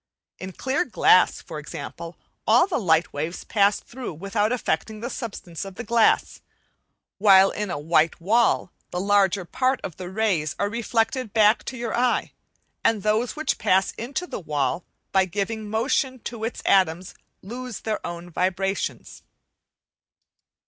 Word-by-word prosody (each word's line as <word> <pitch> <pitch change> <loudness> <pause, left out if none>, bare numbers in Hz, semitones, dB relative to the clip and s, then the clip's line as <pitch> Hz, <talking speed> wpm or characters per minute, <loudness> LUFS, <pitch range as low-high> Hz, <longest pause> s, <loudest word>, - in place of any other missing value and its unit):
In 185 0 -7
clear 265 +7 0
glass, 185 -6 +4
for 155 - -7
example, 165 +2 -8 0.3
all - - +6
the 370 -7 -1
light 165 -5 +2
waves 155 +5 -4
pass 200 -1 +2
through 245 -8 -8
without 205 +5 -1
affecting 220 -3 -2
the 240 +4 -5
substance 195 -8 -6
of 195 -1 -9
the 240 - -6
glass; 230 -1 +2 0.8
while 195 -1 +7
in 210 -1 -3
a 175 - -2
white 155 +2 +2
wall 215 +1 +2 0.2
the 180 - -3
larger 200 -1 +2
part 255 +7 0
of 175 - -6
the 180 -1 -6
rays 190 -7 0
are 200 - 0
reflected 230 +1 -1
back 215 0 +4
to 260 - -5
your 235 -1 -3
eye, 245 0 +1 0.5
and 215 -4 +2
those 215 +3 +1
which 310 0 -1
pass 190 +1 +2
into 270 +9 -4
the - - -6
wall, 155 0 -1 0.3
by 190 -1 +4
giving 205 +3 -3
motion 255 +4 0
to 230 -1 -6
its 230 - -5
atoms 185 -2 +2 0.3
lose 245 +3 -7
their 220 -1 -3
own 170 0 -6
vibrations. 190 +3 -2
205 Hz, 150 wpm, -24 LUFS, 180-235 Hz, 0.8 s, while